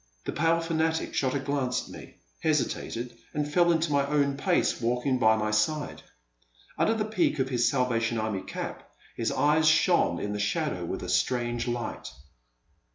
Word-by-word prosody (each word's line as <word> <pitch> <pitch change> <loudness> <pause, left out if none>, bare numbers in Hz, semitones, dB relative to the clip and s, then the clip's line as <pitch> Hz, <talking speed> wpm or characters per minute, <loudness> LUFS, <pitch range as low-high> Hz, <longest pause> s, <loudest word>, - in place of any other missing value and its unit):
*' - - -37
The - - -2
pale 165 +2 +2
fanatic 160 -1 -1
shot 130 0 0
a - - +1
glance 135 -2 -1
at - - -14
me, - - -11 0.3
hesitated, 120 +1 -1 0.2
and 150 0 0
fell 170 +3 +3
into 160 -1 +1
my 140 -1 +3
own 140 -1 +1
pace, 135 - +1
walking 125 +2 0
by 110 -2 +5
my 110 0 -1
side. 145 +8 0 0.7
Under 225 - +2
the 215 -1 -1
peak 210 -7 +1
of 130 -1 0
his 120 -2 +2
Salvation 120 -3 0
Army 110 -3 -2
cap - - -7 0.3
his 115 - -1
eyes 150 +3 +3
shone 160 - +3
in 105 0 -3
the 105 - -3
shadow 105 - -1
with 95 - -4
a - - -5
strange 120 +5 0
light. 120 0 -4
130 Hz, 175 wpm, -27 LUFS, 115-155 Hz, 0.7 s, by